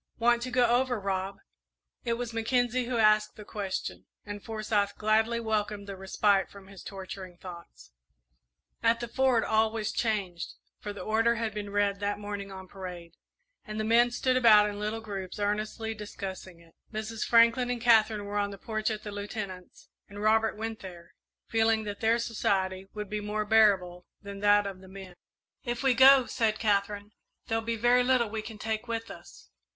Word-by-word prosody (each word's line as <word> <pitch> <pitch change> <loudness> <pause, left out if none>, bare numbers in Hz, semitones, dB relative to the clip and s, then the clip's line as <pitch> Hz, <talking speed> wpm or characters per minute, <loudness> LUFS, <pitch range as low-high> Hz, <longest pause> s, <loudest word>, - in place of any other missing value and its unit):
"Want 235 0 +3
to 255 - -3
go 250 0 +3
over, 245 0 +2
Rob?" 195 0 -2 0.7
It 235 - +1
was 235 0 -4
Mackenzie 245 +2 +1
who 245 0 -2
asked 215 -1 +4
the 210 - -11
question, 200 -3 -5 0.2
and 205 -1 -7
Forsyth 215 -2 -1
gladly 220 +2 +2
welcomed 210 -2 -2
the 200 -1 -7
respite 195 +1 +1
from 200 -1 -13
his 195 -2 -12
torturing 190 -2 -8
thoughts. 170 - -12 0.9
At 230 0 +3
the 240 - -4
Fort 255 -1 +2
all 220 0 +2
was 220 -2 -2
changed, 200 -7 -2 0.2
for 205 - -5
the 205 - -8
order 225 +2 +2
had 225 -2 -2
been 210 -1 -5
read 200 -1 +1
that 205 0 -1
morning 205 -1 -6
on 190 -1 -9
parade, 180 -3 -9 0.5
and 215 -1 -6
the - - 0
men 235 +2 +4
stood 255 +1 0
about 215 -4 +7
in 205 0 -5
little 215 +2 -3
groups 195 -4 -6
earnestly 215 +2 -2
discussing 190 -4 -8
it. 165 -1 -21 0.2
Mrs. 220 +1 -4
Franklin 235 +1 +4
and 245 -1 -1
Katherine 220 -3 +4
were 205 0 -2
on 200 0 0
the 200 - -8
porch 215 +2 -2
at 215 -1 -4
the 205 - -6
Lieutenant's, 200 -3 -7 0.2
and 205 0 -9
Robert 220 +1 +2
went 225 0 -4
there, 175 -3 -11 0.3
feeling 225 -1 +2
that 205 -1 -6
their 225 +1 +3
society 195 -5 -1
would 210 -1 -4
be 210 +1 -3
more 210 +1 -2
bearable 195 -5 +3
than 200 -1 -9
that 205 0 +4
of 195 -2 -6
the 190 - -14
men. 190 -1 -10 0.5
"If 240 +1 -3
we 265 -2 +4
go," 265 +1 +7
said 225 -4 0
Katherine, 205 -1 0 0.3
"there'll 225 0 -1
be 230 +1 -1
very 245 +2 +4
little 245 -4 +2
we 220 -1 -3
can 220 0 -9
take 220 +2 -3
with 230 0 -4
us." - - -14
215 Hz, 185 wpm, -29 LUFS, 200-230 Hz, 0.9 s, about